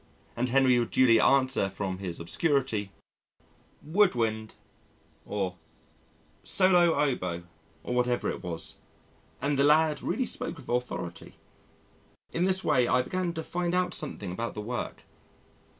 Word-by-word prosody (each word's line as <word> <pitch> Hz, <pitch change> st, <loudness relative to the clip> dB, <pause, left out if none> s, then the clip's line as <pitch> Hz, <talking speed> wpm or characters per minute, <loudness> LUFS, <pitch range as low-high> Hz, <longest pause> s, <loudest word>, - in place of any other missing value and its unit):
And 125 Hz, +2 st, -1 dB
Henry 130 Hz, -1 st, +4 dB
would 120 Hz, -, -1 dB
duly 115 Hz, -3 st, +5 dB
answer 130 Hz, -7 st, +3 dB
from 95 Hz, -1 st, -4 dB
his 90 Hz, -3 st, -5 dB
obscurity, 110 Hz, -, 0 dB, 0.9 s
"Wood 180 Hz, +1 st, +3 dB
wind," 110 Hz, -2 st, -2 dB, 0.7 s
or 95 Hz, -3 st, -2 dB, 0.9 s
"Solo 180 Hz, -3 st, +4 dB
oboe," 90 Hz, -12 st, -1 dB, 0.4 s
or -, -, -3 dB
whatever 125 Hz, 0 st, +1 dB
it -, -, -7 dB
was, 85 Hz, -2 st, -6 dB, 0.7 s
and 140 Hz, -1 st, +1 dB
the -, -, +5 dB
lad 150 Hz, 0 st, +4 dB
really 260 Hz, -, -1 dB
spoke 170 Hz, -, -3 dB
with 145 Hz, -, -13 dB
authority. 120 Hz, -8 st, -4 dB, 1.0 s
In 175 Hz, -, +1 dB
this 190 Hz, 0 st, +1 dB
way, 125 Hz, -3 st, +3 dB
I 125 Hz, +1 st, +3 dB
began 185 Hz, +5 st, -2 dB
to 160 Hz, -1 st, -4 dB
find 175 Hz, +1 st, -2 dB
out 180 Hz, 0 st, +1 dB
something 105 Hz, -11 st, -3 dB
about 115 Hz, +6 st, -4 dB
the 105 Hz, -, -4 dB
work. 120 Hz, +3 st, -5 dB
125 Hz, 135 wpm, -28 LUFS, 105-160 Hz, 1.0 s, duly